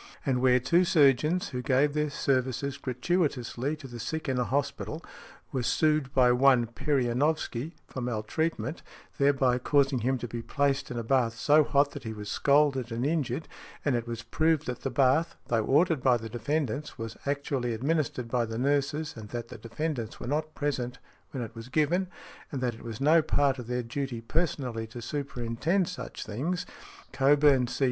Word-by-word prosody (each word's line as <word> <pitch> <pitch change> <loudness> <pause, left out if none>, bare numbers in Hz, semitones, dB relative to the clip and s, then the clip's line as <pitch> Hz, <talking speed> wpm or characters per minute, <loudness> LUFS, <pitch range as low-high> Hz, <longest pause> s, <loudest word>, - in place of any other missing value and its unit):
And 130 -3 +1
where 125 -1 +5
two 170 +8 +3
surgeons, 155 +3 +3
who 125 - -4
gave 135 +2 +2
their 150 0 0
services 130 0 -1
gratuitously 135 -1 -1
to 150 -3 -10
the 120 -2 -9
sick 160 +8 -4
in 130 -2 0
a - - +2
hospital, 140 +5 -2 0.5
were 130 - -1
sued 150 +2 +2
by 125 -2 +5
one 125 -1 +5
Perionowsky, 135 +3 0
for 130 - -6
maltreatment 125 +5 -2 0.4
there 140 0 +5
by 130 -3 +2
causing 135 0 +2
him 130 +3 +1
to 120 - -5
be 120 +1 -5
placed 140 +2 0
in 125 - -5
a 115 - -2
bath 115 -2 +1
so 150 +5 +5
hot 140 0 +2
that - - -7
he 110 -2 -4
was 105 -1 -6
scalded 140 -4 +2
and 115 +3 -1
injured, 150 -2 -1 0.4
and 140 -4 +2
it 120 0 -2
was 115 -1 -5
proved 155 +6 +1
that 125 -1 -4
the 135 - -2
bath, 140 +5 +2
though 115 -2 +2
ordered 155 +1 +3
by 125 -1 +4
the 115 -1 -7
defendants, 140 +4 -2
was 115 -1 -6
actually 140 -3 -1
administered 130 0 -1
by 120 0 +1
the 110 0 -4
nurses, 145 +4 0
and 110 -2 -9
that 120 0 -5
the - - -8
defendants 115 0 -4
were - - -6
not 155 +4 -2
present 130 -4 -2 0.3
when 130 -3 -4
it 115 - -8
was 115 +1 -9
given, 160 +7 +1 0.4
and 140 - -3
that 125 -2 0
it 115 - -13
was 115 -2 -7
no 155 +4 +5
part 145 -3 +1
of 120 - -7
their 125 0 -1
duty 125 0 -4
personally 125 -3 -2
to 120 +2 -9
superintend 140 +6 -1
such 180 - -6
things. 155 +12 -2 0.5
Cockburn, 140 -2 +4
C. 120 - -5
135 Hz, 185 wpm, -28 LUFS, 120-150 Hz, 0.5 s, where